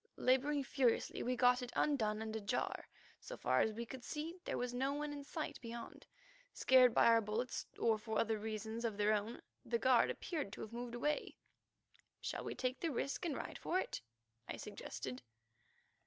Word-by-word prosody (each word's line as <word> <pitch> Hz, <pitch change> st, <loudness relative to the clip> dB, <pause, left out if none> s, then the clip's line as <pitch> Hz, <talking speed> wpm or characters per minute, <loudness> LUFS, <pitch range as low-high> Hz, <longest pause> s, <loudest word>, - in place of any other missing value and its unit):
Labouring 275 Hz, +3 st, +3 dB
furiously 260 Hz, -3 st, +1 dB
we 250 Hz, +1 st, 0 dB
got 250 Hz, +1 st, +5 dB
it 245 Hz, -1 st, -5 dB
undone 220 Hz, -7 st, +1 dB
and 220 Hz, 0 st, -4 dB
ajar. 220 Hz, +2 st, -2 dB, 0.3 s
So -, -, -8 dB
far -, -, +2 dB
as 220 Hz, -, +3 dB
we 230 Hz, +2 st, -4 dB
could 255 Hz, +1 st, -8 dB
see 310 Hz, +5 st, -4 dB
there -, -, -1 dB
was 245 Hz, 0 st, -2 dB
no 265 Hz, +3 st, 0 dB
one 295 Hz, 0 st, -2 dB
in 285 Hz, -1 st, -6 dB
sight 300 Hz, 0 st, -4 dB
beyond. 235 Hz, 0 st, -8 dB, 0.5 s
Scared 255 Hz, -1 st, +7 dB
by -, -, +5 dB
our 230 Hz, -1 st, +7 dB
bullets 225 Hz, +4 st, -2 dB
or 220 Hz, -2 st, +3 dB
for 220 Hz, 0 st, -2 dB
other 225 Hz, -1 st, +1 dB
reasons 220 Hz, +1 st, -4 dB
of 225 Hz, -3 st, -1 dB
their 210 Hz, +1 st, +4 dB
own, 215 Hz, +3 st, -2 dB, 0.2 s
the 235 Hz, 0 st, 0 dB
guard 250 Hz, +1 st, +5 dB
there -, -, -1 dB
appeared 310 Hz, -, -3 dB
to -, -, -7 dB
have 220 Hz, -, -7 dB
moved 240 Hz, 0 st, -4 dB
away. 295 Hz, +5 st, -1 dB, 0.8 s
"Shall -, -, -3 dB
we -, -, -4 dB
take 255 Hz, 0 st, -1 dB
the 335 Hz, -, 0 dB
risk 275 Hz, +5 st, -2 dB
and 300 Hz, -5 st, -1 dB
ride -, -, -5 dB
for 365 Hz, -, +1 dB
it?" -, -, -3 dB, 0.5 s
I -, -, -4 dB
suggested. 125 Hz, -1 st, -6 dB
245 Hz, 190 wpm, -38 LUFS, 220-275 Hz, 0.8 s, Scared